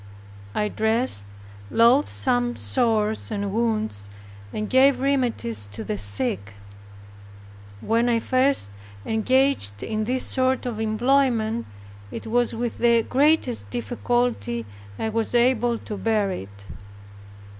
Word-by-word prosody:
I 210 - +1
dressed 220 - 0 0.4
loathsome 245 0 +2
sores 220 -4 0
and 200 -2 -3
wounds, 215 - -1 0.4
and 215 0 -3
gave 265 +3 +4
remedies 240 - -1
to 110 +2 -5
the 105 - -3
sick. 100 0 +1 1.3
When 230 - +1
I 235 - +3
first 260 - +1 0.4
engaged 225 - +1
in 215 -1 -2
this 255 +3 0
sort 260 0 +1
of 235 -3 -4
employment, 230 0 +1 0.4
it - - -7
was 240 +1 0
with 235 0 -3
the 235 -1 +4
greatest 265 - +1
difficulty 115 +1 -1 0.3
I 220 - -2
was 225 +2 -1
able 240 -1 +3
to 210 -2 -7
bear 210 -2 0
it. 100 - -8
225 Hz, 115 wpm, -24 LUFS, -, 1.3 s, gave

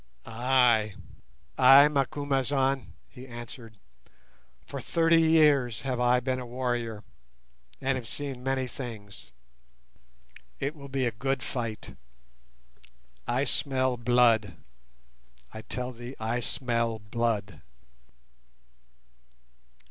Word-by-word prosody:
"Ay, 120 -3 +2 0.6
ay, 135 +3 +8
Macumazahn," 135 - 0
he 125 +1 -12
answered. 120 -2 -9 0.9
"For 140 - -7
thirty 165 +3 +3
years 145 -8 +3
have 130 -2 -2
I 125 0 +3
been 130 +1 -2
a 125 - -6
warrior, 120 -3 -3 0.8
and 135 0 0
have 120 -3 -7
seen 135 0 -6
many 135 0 -1
things. 105 - -9 1.3
It 140 +3 -2
will 140 -2 -11
be 135 -1 -1
a 120 - 0
good 135 +3 -2
fight. 115 -3 -5 1.3
I 125 +3 +1
smell 130 -2 +1
blood—I 65 - -2
tell 125 +2 -4
thee, 120 +2 -9
I 115 +2 -1
smell 115 -2 -1
blood." 105 -1 -2
125 Hz, 95 wpm, -28 LUFS, 110-135 Hz, 1.3 s, ay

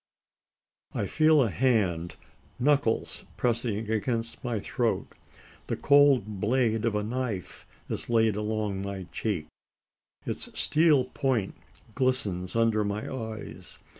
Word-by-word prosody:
I - - 0
feel 155 -2 +4
a 115 - -1
hand 95 -7 +1 0.4
knuckles 140 -3 +1
pressing 115 -3 -1
against 115 +1 -2
my 120 -4 -1
throat; - - -1 0.6
the - - -1
cold 135 -8 +4
blade 115 -1 +1
of 115 -2 +1
a 105 - 0
knife 115 -4 -4 0.2
is - - -4
laid 110 -3 +3
along 105 -2 -2
my 100 -1 -4
cheek; 100 -9 -2 0.8
its - - -5
steel 150 -4 +4
point 130 -6 -1 0.4
glistens 105 -8 -1
under 115 -2 +3
my 105 +4 -3
eyes. 110 -3 -7
115 Hz, 115 wpm, -28 LUFS, 105-130 Hz, 0.8 s, feel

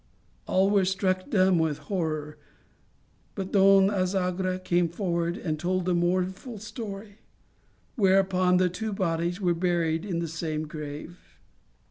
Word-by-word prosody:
All 190 +2 +3
were 200 -2 +4
struck 185 +2 0
dumb 190 - +3
with 160 -3 0
horror, 155 -5 -3 1.0
but 190 -2 -4
Don 195 0 +5
Azagra 185 -1 0
came 175 -2 +1
forward 170 -1 -2
and 155 -3 -3
told 180 +1 -1
the 180 - +1
mourn 180 +2 +1
ful 230 +4 -9
story, 205 -1 -8 0.8
whereupon 190 -2 +3
the 185 0 +3
two 210 +5 -4
bodies 175 -1 -1
were 180 -3 +2
buried 170 -2 0
in 190 -5 -3
the 170 0 -2
same 155 -1 -3
grave. 150 +3 -9
185 Hz, 135 wpm, -27 LUFS, 170-195 Hz, 1.0 s, Don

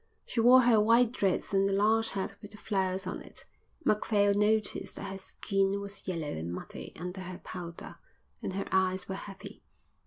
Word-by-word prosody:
She 235 - -3
wore 250 +3 +8
her 235 -3 +5
white 230 +2 +5
dress 200 -3 0
and 195 0 +3
the - - 0
large 220 +3 +3
hat 195 -1 -3
with 205 - -9
the - - -11
flowers 190 -3 -1
on 185 - -4
it. - - -11 0.4
Macphail 205 -1 +3
noticed 210 +1 +1
that 195 0 -6
her 195 - -6
skin 195 0 -1
was 200 0 -8
yellow 165 -5 -2
and 80 +2 -4
muddy 90 - -7
under 180 +3 -6
her 185 -1 -7
powder, 170 -2 -8 0.4
and - - -3
her 195 +1 -2
eyes 185 -1 +1
were 190 - -3
heavy. 195 0 -8
195 Hz, 185 wpm, -30 LUFS, 185-210 Hz, 0.4 s, wore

